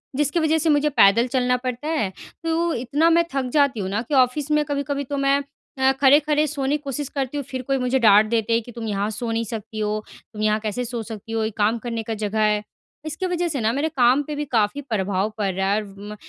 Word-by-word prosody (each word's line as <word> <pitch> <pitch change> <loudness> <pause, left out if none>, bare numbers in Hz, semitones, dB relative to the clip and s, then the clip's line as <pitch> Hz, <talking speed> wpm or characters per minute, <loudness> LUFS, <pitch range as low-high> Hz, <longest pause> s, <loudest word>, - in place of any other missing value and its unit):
जिसकी 295 +3 +1
वज़ह 315 0 +2
से 320 +1 +1
मुझे 295 0 +3
पैदल 230 -2 +5
चलना 250 0 +1
पड़ता 250 +3 -4
है 300 -12 0 0.3
तो 330 +1 0
इतना 285 +7 +1
मैं 335 +1 +4
थक 270 -2 0
जाती 280 -6 +3
हूँ 190 -2 -3
ना 205 +3 -1
कि 250 +5 -7
ऑफ़िस 265 +3 +2
में 300 0 +3
कभी-कभी 285 0 -2
तो 285 +2 -4
मैं 275 0 +2 0.4
अ, 265 0 +4
खड़े-खड़े 295 +2 +4
सोने 285 0 -1
की - - -21
कोशिश 280 0 -4
करती 275 0 -3
हूँ 285 - -2
फिर 260 0 -4
कोई 270 +1 -1
मुझे 255 +1 +1
डाँट 210 -2 +6
देते 230 0 0
हैं 230 - +2
कि 240 - -11
तुम 230 -1 -6
यहाँ 205 0 -1
सो 225 +2 -4
नहीं 225 0 0
सकती 220 0 -6
हो। 215 0 -1 0.3
तुम 210 - -6
यहाँ 215 0 +2
कैसे 220 +3 -3
सो 240 0 -4
सकती 225 0 -9
हो? 225 -1 0
ये 220 - 0
काम 215 +2 +2
करने 230 -1 -4
का 225 - -4
जगह 215 0 -2
है। 210 -1 +2 0.4
इसकी 325 +4 -3
वज़ह 350 -1 -1
से 295 -6 -2
ना 220 +1 +2
मेरे 290 +4 0
काम 260 -1 +3
पे 300 +1 -5
भी 295 0 -3
काफ़ी 230 +1 0
प्रभाव 205 -5 -1
पड़ 200 -2 0
रहा 190 +1 -1
है 215 - +1
व 195 -1 -13 0.2
म - - -6
250 Hz, 250 wpm, -22 LUFS, 220-290 Hz, 0.4 s, डाँट